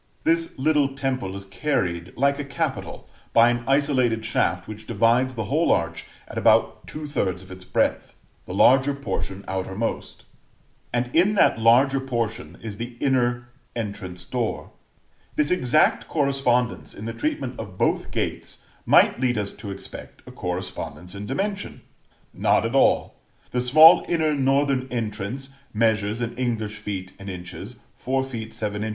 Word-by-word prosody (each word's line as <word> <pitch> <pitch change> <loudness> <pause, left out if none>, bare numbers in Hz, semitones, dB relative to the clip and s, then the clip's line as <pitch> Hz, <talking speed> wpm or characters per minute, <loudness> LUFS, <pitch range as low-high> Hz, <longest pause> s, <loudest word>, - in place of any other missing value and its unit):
This 165 0 +1
little 140 -1 +2
temple 130 -8 -2
is 100 0 -7
carried, 95 - -2
like 140 +2 +2
a - - -2
capital, 140 +1 -4 0.3
by 115 +1 +6
an 120 0 -2
isolated 130 -5 +2
shaft 90 -4 0
which 110 0 -9
divides 115 +4 +2
the 110 - -2
whole 150 +10 +1
arch 85 0 0 0.2
at - - -4
about - - +3
2/3 120 - -3
of 95 - -14
its 95 0 -9
breadth, - - -1 0.3
the - - -5
larger 135 +2 +5
portion 100 -8 -4
outmost; 95 +4 -3 0.7
and 120 +1 -2
in 190 +6 +4
that 155 - +4
larger 130 +5 +5
portion 120 -3 -3
is 105 -3 -6
the 120 +2 -6
inner 120 -3 +1 0.3
entrance 100 -5 -5
door. 120 -3 -3 0.6
This 150 +1 +1
exact 155 -5 +3
correspondence, 135 -5 0
in 105 - -8
the 115 - -4
treatment 130 +1 -3
of 95 -2 -7
both - - +1
gates, - - -4 0.2
might - - +5
lead 125 -2 +1
us 100 -1 -2
to 100 0 -8
expect 95 -1 -9
a - - -10
correspondence 90 -2 -5
in 100 +1 -7
dimension. 195 +9 -3 0.5
Not - - +2
at - - -2
all. - - +2 0.3
The 125 - 0
small 155 +7 +8
inner 160 -3 +2
northern 135 -1 +1
entrance 115 +3 -4 0.2
measures, 110 0 +1
in 120 0 -3
English 110 -4 -2
feet 95 -3 -5
and 100 0 -7
inches, 90 -1 -8 0.2
4 130 +1 -1
ft. 115 -4 -6
7 105 -1 -3
in. 110 - -2
120 Hz, 150 wpm, -24 LUFS, 105-135 Hz, 0.7 s, small